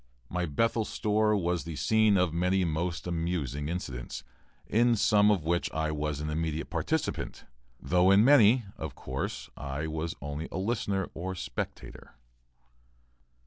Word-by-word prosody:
My 90 -1 -1
Bethel 115 +9 +1
store 105 0 +1
was 90 -2 0
the 85 -1 -6
scene 105 +8 +3
of 90 -3 +2
many 90 +2 +2
most 85 +2 -2
amusing 80 -5 -2
incidents, 65 -7 -5 0.4
in 120 +2 +3
some 105 -1 +4
of 100 -6 +2
which 85 +2 0
I 80 -1 0
was 75 -1 -2
an 75 - -3
immediate 80 0 -2
participant, - - -2 0.3
though 90 +6 +3
in 100 +3 +6
many, 125 -4 +6
of 80 -7 -6
course, 65 +1 -4
I 70 +1 -4
was 80 +1 -3
only 75 +3 -5
a - - -4
listener 100 -2 -1
or 95 +3 -4
spectator. 85 - -6
85 Hz, 145 wpm, -29 LUFS, 75-100 Hz, 0.4 s, in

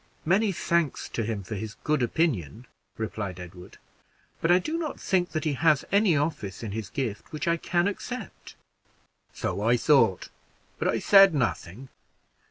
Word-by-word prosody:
"Many 195 +5 +3
thanks 170 -4 -1
to - - -3
him 105 -2 -3
for 110 - -7
his 110 +1 -5
good 150 -2 +1
opinion," 120 - -1 0.3
replied 105 -4 -4
Edward; 90 0 -11 0.6
"but 165 - +1
I 175 - +7
do 305 - -3
not 325 -3 -4
think 180 -2 0
that 155 - -3
he 155 -3 0
has 150 +1 +2
any 200 -5 +4
office 140 - -3
in 110 - -4
his 105 -2 -5
gift 115 -5 -4
which 155 0 -4
I 170 0 +2
can 175 +2 0
accept." 245 +5 -6 0.8
"So - - -3
I - - +3
thought, - - +3 0.5
but - - 0
I - - +1
said 195 -4 +6
nothing. 125 -2 -3
150 Hz, 165 wpm, -26 LUFS, 110-175 Hz, 0.8 s, I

